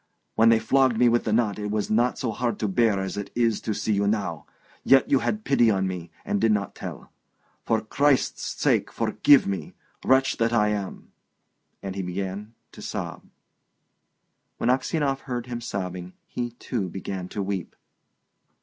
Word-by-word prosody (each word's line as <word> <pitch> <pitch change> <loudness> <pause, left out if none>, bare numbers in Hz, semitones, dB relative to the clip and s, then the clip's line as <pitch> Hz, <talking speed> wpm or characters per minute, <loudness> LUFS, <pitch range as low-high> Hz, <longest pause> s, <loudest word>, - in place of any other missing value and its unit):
"When 115 +1 +5
they 115 - +6
flogged 130 +2 +2
me 120 +1 +5
with 120 0 +1
the 110 - 0
knot 105 -2 +1
it 105 0 -3
was 105 0 -2
not 120 +3 +2
so 120 - -2
hard 120 0 -2
to 105 - -1
bear 105 0 +2
as 95 0 -4
it 100 -1 -4
is 115 -3 +1
to 110 - -2
see 110 - 0
you 100 0 +1
now... 100 -7 -2 0.4
yet 135 -1 +4
you 135 - +5
had 215 +9 -2
pity 120 - +4
on 95 -3 +1
me, 90 -2 -4 0.2
and 100 - -1
did 115 0 +4
not 100 -2 0
tell. - - -8 0.6
For 110 -1 +2
Christ's 135 +5 +1 0.2
sake - - +2
forgive 145 -2 +4
me, 100 -1 -4 0.3
wretch 130 0 +3
that 115 +1 +1
I 105 -2 +3
am!" 100 -2 -4 0.7
And 95 -1 -4
he 100 - -2
began 95 +4 -5 0.2
to - - -12
sob. - - -5 1.3
When 120 - +2
Aksionov 135 +1 0
heard 125 -4 -4
him 120 -1 -5
sobbing 90 -4 -5
he, 120 -1 -4
too, 115 -5 -3
began 95 0 -5
to 100 - -3
weep. 95 -3 -4
110 Hz, 175 wpm, -25 LUFS, 100-120 Hz, 1.3 s, they